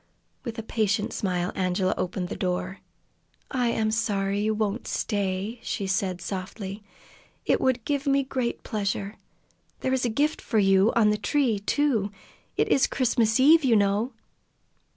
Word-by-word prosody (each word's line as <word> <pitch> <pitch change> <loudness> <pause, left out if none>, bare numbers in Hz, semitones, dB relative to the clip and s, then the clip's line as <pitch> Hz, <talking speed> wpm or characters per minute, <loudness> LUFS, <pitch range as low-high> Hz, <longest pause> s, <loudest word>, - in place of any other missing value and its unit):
With 235 -2 -5
a 225 - -4
patient 215 -2 0
smile 180 -2 -1
Angela 185 0 0
opened 180 0 -3
the - - -4
door. 185 +1 -2 0.7
"I 250 -3 +1
am 220 -2 +1
sorry 200 -3 0
you 215 +1 +1
will 215 -1 +1
not 230 - -7
stay," 200 +2 -2
she 200 - -3
said 190 -2 -1
softly. 195 +1 -5 0.6
"It - - +2
would 255 -3 +1
give 285 -1 -1
me 275 0 +3
great 255 -3 -3
pleasure. 200 -1 -3 0.6
There 260 - 0
is 260 - +1
a 245 - +2
gift 290 +7 0
for 225 - -1
you 195 +1 +4
on 215 -2 +5
the 210 - +1
tree, 260 -8 +1
too. 220 -2 +1 0.5
It - - +2
is 270 - +4
Christmas 230 -3 +1
Eve, 310 +4 +6
you 245 -4 +4
know!" 205 +4 +2
215 Hz, 160 wpm, -26 LUFS, 195-245 Hz, 0.7 s, Eve